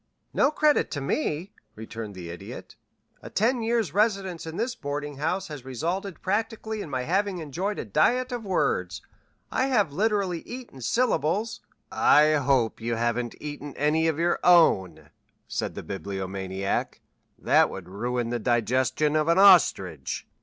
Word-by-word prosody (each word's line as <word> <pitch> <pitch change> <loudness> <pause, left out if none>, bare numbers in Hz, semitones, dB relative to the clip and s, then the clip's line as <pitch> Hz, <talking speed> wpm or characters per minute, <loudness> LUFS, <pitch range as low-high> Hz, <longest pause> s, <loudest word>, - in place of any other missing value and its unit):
"No 275 - +4
credit 305 0 +2
to 145 - -2
me," 160 - -2 0.2
returned 110 -1 -7
the 85 -2 -7
Idiot. 85 - -9 0.5
"A - - -9
ten 235 +4 +1
years' 225 -7 0
residence 195 -5 0
in 160 +2 -6
this 240 +2 -1
boarding 145 - -5
house 180 +6 -1
has 145 -4 -8
resulted 170 - -4
practically 220 +2 -2
in 160 - -7
my 130 -2 -2
having 195 +5 0
enjoyed 175 +6 -3
a - - -4
diet 250 - +2
of 240 -2 -4
words. 190 -3 -1 0.5
I 260 - +1
have 210 - +1
literally 200 -2 0
eaten 245 - -9
syllables 215 - 0 0.3
" - - -47 0.3
"I 150 +1 +6
hope 130 -6 +1
you 115 +1 -1
haven't 120 +1 -1
eaten 145 -1 -7
any 155 +3 +2
of 160 -2 0
your 170 +1 +1
own," 95 - +4 0.4
said - - -3
the - - -6
Bibliomaniac. 95 0 -3 0.4
"That - - +3
would 90 -2 -8
ruin 120 +5 -2
the 120 - -1
digestion 125 +6 +1
of 155 0 +2
an 170 +1 +3
ostrich." 95 - +4
155 Hz, 155 wpm, -26 LUFS, 120-200 Hz, 0.5 s, I